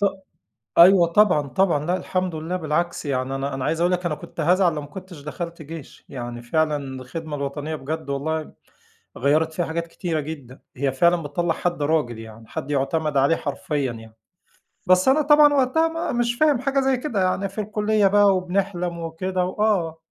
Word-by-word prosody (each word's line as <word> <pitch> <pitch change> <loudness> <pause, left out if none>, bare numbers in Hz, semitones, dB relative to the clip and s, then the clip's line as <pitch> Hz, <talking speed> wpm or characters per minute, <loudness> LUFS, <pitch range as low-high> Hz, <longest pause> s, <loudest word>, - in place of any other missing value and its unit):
ط - - +2 0.7
أيوه 175 0 +8
طبعًا، 170 -5 +3
طبعًا. 150 +1 +1
لأ، 180 +1 +1
الحمد 185 -1 -2
لله 160 +3 -3
بالعكس 170 0 -2
يعني 130 -1 -1
أنا 135 +1 -3
أنا 135 -1 -3
عايز 165 +1 -1
أقول 175 +1 +2
لِك 180 0 -1
أنا 155 - 0
كنت 165 - -9
هازعل 175 +1 +3
لو 150 - -3
ما 145 - -9
كنتش 180 +1 -10
دخلت 170 +3 -6
جيش. 155 -1 -10
يعني 120 -2 -6
فعلًا 155 +5 +1
الخدمة 140 +3 -6
الوطنية 145 +2 -4
بجد 155 +1 -5
والله 155 +3 -2 0.7
غيّرت 155 +5 +2
فيّا 175 +2 -1
حاجات 170 +1 -3
كتيرة 165 -1 -3
جدًا. 140 -4 -8 0.2
هي 135 0 0
فعلًا 170 +5 +3
بتطلَّع 165 +3 -1
حد 175 -4 -2
راجل 145 -7 0
يعني، 110 0 -11
حد 135 - -6
يعتمد 150 +2 0
عليه 140 +4 +4
حرفيًا 145 -3 -2
يعني. 115 -1 -12 0.7
بس 185 +2 +4
أنا 275 +4 +5
طبعًا 295 0 +6
وقتها 280 +4 +3
ما 330 0 -3
مش 240 0 0
فاهم 295 -2 +3
حاجة 275 +2 0
زي 265 -1 +2
كده 240 -8 -1
يعني 190 +1 0
في 195 +3 -4
الكلية 210 -1 +1
بقى 200 -1 +4
وبنحلم 180 -2 -2
وكده، 180 +3 -2
وآه. 185 -5 0
165 Hz, 180 wpm, -23 LUFS, 145-190 Hz, 0.7 s, أيوه